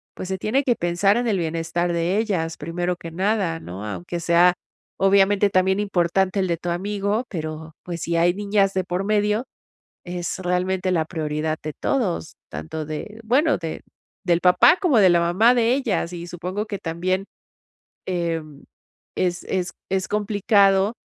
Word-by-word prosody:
pues, 185 - -6
se 190 - -1
tiene 230 +9 0
que 245 -3 +2
pensar 175 +4 +2
en 240 0 0
el 210 -4 +1
bienestar 165 +1 -1
de 170 +3 0
ellas 175 -7 -1
primero 175 +3 -2
que 165 - -8
nada, 190 -2 0
¿no? 95 - -8
Aunque 105 - -5
sea, 170 +1 +4 0.5
obviamente 200 +1 +4
también 190 +1 +2
importante 190 0 +1
el 190 - +1
de 170 -1 0
tu 175 - -5
amigo, 200 +5 -1
pero, 160 -2 -6
pues 170 -2 -6
si 170 - -1
hay 175 +1 +3
niñas 200 -1 +1
de 185 - +1
por 180 +2 -3
medio, 210 +3 +1 0.6
es 175 -1 -4
realmente 185 +1 0
la 165 -3 +2
prioridad 155 -1 -2
de 155 0 -4
todos, 200 - -1
tanto 80 - -6
de 155 +8 -6
bueno, 285 +7 +3
de 165 -2 -5 0.4
del 170 -1 +3
papá 180 - +6
como 310 - +4
de 190 -3 +6
la 175 -1 +4
mamá 190 +8 +4
de 235 0 +3
ellas, 225 -10 -1
y 170 0 -6
supongo 180 +4 -4
que 205 -2 -4
también, 185 +4 -2 0.8
em, 165 -5 -3 0.5
es 175 -1 -1
es 180 -2 -2 0.2
es 190 0 -1
complicado, 205 -1 +3
180 Hz, 165 wpm, -23 LUFS, 170-205 Hz, 0.8 s, papá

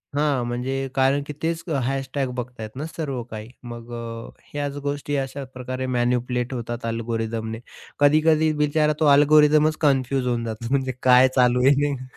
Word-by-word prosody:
हां. 145 -4 +1
म्हणजे 130 +3 -2
कारण 135 +1 +3
की 150 - -5
तेच 165 0 -2 0.2
# 135 +1 -2
बघताय 125 -3 -6
ना 145 - -3
सर्व 150 -6 -4
काही. 110 -1 -9
मग 120 -1 -9
अ, 115 -1 -6 0.2
ह्याच 145 -1 -4
गोष्टी 145 0 -2
अशा 135 +1 -4
प्रकारे 130 +1 -5
मॅनिप्युलेट 125 +1 0
होतात 120 -1 -5
अल्गोरिदमने. 115 -1 -3 0.4
कधी-कधी 155 +2 +4
बिचारा 150 +1 +2
तो 155 - +2
अल्गोरिदमच 150 +1 +5
कन्फ्यूज 135 -3 +1
होऊन 120 -1 0
जातो 115 +1 -5
म्हणजे 135 -1 +1
काय 125 0 +7
चालू 125 -1 +4
आहे 140 - +7
नेमकं. 140 -3 -3
130 Hz, 155 wpm, -23 LUFS, 120-145 Hz, 0.4 s, काय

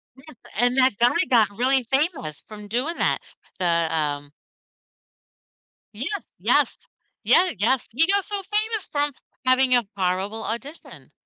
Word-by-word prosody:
Yes, 280 +2 -15 0.2
and 245 +3 +3
that 260 -2 +4
guy 240 +1 +4 0.2
got 230 -4 +4
really 260 +2 +3
famous 270 - -1
from 210 -1 -10
doing 255 +10 -2
that, - - +1 0.4
the, 180 - -1
um 155 -4 0 1.6
Yes, 320 - -5
yes. - - +2 0.5
Yeah. 360 +1 +4
Yes. 235 +6 +1
He 305 +6 +3
got 400 0 +2
so 405 -1 -2
famous 425 +2 -2
from 290 0 0 0.3
having 255 0 +4
a 240 -5 +1
horrible 190 +4 -1
audition. 270 +8 -7
255 Hz, 135 wpm, -23 LUFS, 210-305 Hz, 1.6 s, that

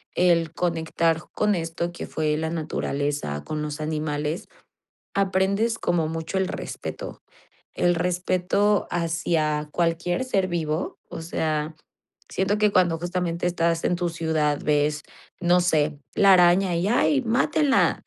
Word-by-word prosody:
el 170 -3 +3
conectar 165 -1 0
con 210 0 +2
esto, 170 -1 -2
que 175 - -7
fue 155 -1 0
la 160 +1 -2
naturaleza, 145 - -2
con 150 - -4
los 150 0 -4
animales, 150 0 -2 0.7
aprendes 200 +3 +1
como 165 -3 0
mucho 165 +3 -4
el 190 -1 0
respeto. - - -6 0.5
El 175 - +2
respeto 180 +4 +1
hacia 160 -3 0
cualquier 170 +4 0
ser 195 -7 0
vivo, 165 -2 -2
o - - -6
sea, 155 -1 -2 0.5
siento 195 +2 0
que 210 0 +3
cuando 175 -4 +3
justamente 175 0 -2
estás 170 -1 0
en 180 - +2
tu 175 -1 -1
ciudad 160 -3 0
ves, 150 0 +1 0.4
no 180 0 +4
sé, 155 -4 +1 0.2
la 195 -1 +6
araña 180 0 +4
y 175 +3 0
ay, 270 +4 +3
mátenla. 265 +4 +2
170 Hz, 135 wpm, -24 LUFS, 155-180 Hz, 0.7 s, la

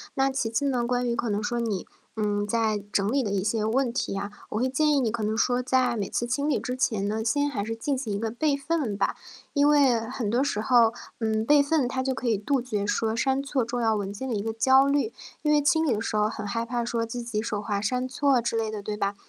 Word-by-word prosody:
那 270 0 +2
其 255 -4 -1
次 230 +5 -1
呢， 250 -4 +1
关 245 0 0
于 235 - 0
可 235 - -2
能 205 0 0
说 240 +2 -1
你， 215 -6 -2 0.3
嗯， 205 -1 0
在 215 -1 0
整 200 +1 +1
理 275 0 +2
的 205 - -2
一 195 -2 0
些 215 +1 0
问 240 +2 +1
题 235 - -2
啊， 200 +1 -4 0.2
我 215 - -2
会 255 - +1
建 300 +4 +2
议 285 - +3
你 230 -4 0
可 230 -1 -3
能 215 +1 0
说 245 +2 +1
在 250 -2 +2
每 200 - -2
次 240 - -1
清 280 +4 -1
理 300 - +1
之 250 - -4
前 220 -6 0
呢， 220 +2 -1
先 285 +5 +1
还 205 -7 -3
是 225 +1 -3
进 270 +4 -2
行 225 -6 -3
一 200 - -2
个 225 - -1
备 280 +5 0
份 280 -6 -1
吧。 200 - 0 0.4
因 285 0 +4
为 280 -6 +5
很 225 -1 -4
多 240 +5 +2
时 215 -7 -1
候， 235 -2 +4 0.3
嗯， 220 -1 0
备 290 +2 +6
份 285 -3 +1
它 260 +1 -2
就 265 0 0
可 250 - -4
以 220 - +2
杜 255 +6 0
绝 210 -5 -2
说 220 +1 0
删 265 +3 +1
错 275 -3 -1
重 240 +1 -3
要 225 -1 +2
文 200 -1 -3
件 265 +6 -5
的 230 - -1
一 200 - -2
个 225 0 -2
焦 265 +4 +5
虑。 280 -5 +1 0.3
因 300 - +1
为 300 - +5
清 320 +3 +3
理 265 - +2
的 215 - -2
时 220 - -3
候 210 0 +2
很 210 -1 -6
害 230 +3 -2
怕 240 0 -2
说 230 -1 -1
自 240 +2 -5
己 220 -3 -2
手 215 -2 -3
滑 205 -1 -2
删 250 +4 -1
错 265 0 +2
之 230 -1 -2
类 225 -1 0
的， 210 -2 -5
对 210 - -3
吧？ 200 -1 -1
235 Hz, 295 characters per minute, -26 LUFS, 215-265 Hz, 0.4 s, 备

